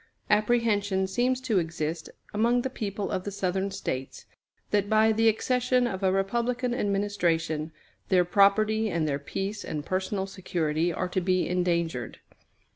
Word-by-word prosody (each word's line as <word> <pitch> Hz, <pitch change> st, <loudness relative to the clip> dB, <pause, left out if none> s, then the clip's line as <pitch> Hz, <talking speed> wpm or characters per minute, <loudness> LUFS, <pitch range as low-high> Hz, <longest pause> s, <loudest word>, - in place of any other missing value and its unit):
Apprehension 210 Hz, -3 st, +2 dB
seems 245 Hz, +6 st, 0 dB
to 230 Hz, -7 st, +1 dB
exist 160 Hz, -1 st, -3 dB, 0.2 s
among 235 Hz, +3 st, +2 dB
the 265 Hz, -, -3 dB
people 205 Hz, -3 st, -4 dB
of 185 Hz, -, -2 dB
the 205 Hz, -, -4 dB
Southern 195 Hz, 0 st, -1 dB
States, 135 Hz, -9 st, -5 dB, 0.5 s
that, 205 Hz, -1 st, +1 dB
by 220 Hz, 0 st, +4 dB
the 225 Hz, +1 st, +3 dB
accession 250 Hz, +3 st, +1 dB
of 195 Hz, -5 st, -3 dB
a 190 Hz, -1 st, +3 dB
Republican 235 Hz, +6 st, 0 dB
administration, 175 Hz, -8 st, 0 dB, 0.4 s
their 180 Hz, -2 st, +4 dB
property 215 Hz, +4 st, +3 dB
and 165 Hz, -4 st, 0 dB
their 140 Hz, -1 st, -1 dB
peace 195 Hz, +8 st, -4 dB
and 150 Hz, -2 st, -5 dB
personal 190 Hz, +1 st, -1 dB
security 175 Hz, -4 st, -1 dB
are 180 Hz, -, -2 dB
to 185 Hz, -, -1 dB
be 185 Hz, 0 st, +1 dB
endangered. 170 Hz, -8 st, -1 dB
195 Hz, 145 wpm, -27 LUFS, 175-220 Hz, 0.5 s, by